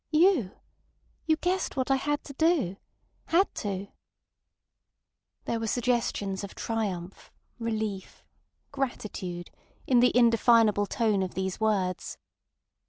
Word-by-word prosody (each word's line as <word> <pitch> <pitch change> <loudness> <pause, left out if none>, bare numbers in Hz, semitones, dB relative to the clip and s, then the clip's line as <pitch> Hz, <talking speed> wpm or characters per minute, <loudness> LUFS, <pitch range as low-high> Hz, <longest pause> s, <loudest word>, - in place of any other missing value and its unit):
"You! 310 - +3 0.7
You 315 - +4
guessed 360 -1 -1
what 260 +1 0
I - - +5
had 295 +2 -1
to 280 - -9
do. 290 - +1 0.5
Had 370 +4 +3
to!" 200 -1 -4 1.6
There 230 - -1
were 225 - -2
suggestions 225 -5 0
of 200 - -8
triumph, 195 -6 -4 0.3
relief, 220 -4 -4 0.5
gratitude 205 -10 -4 0.3
in 250 -2 +4
the 250 +1 +5
indefinable 230 -3 +4
tone 215 -3 +1
of 185 -1 -3
these 190 -1 -2
words. 195 -5 -1
225 Hz, 110 wpm, -28 LUFS, 195-265 Hz, 1.6 s, I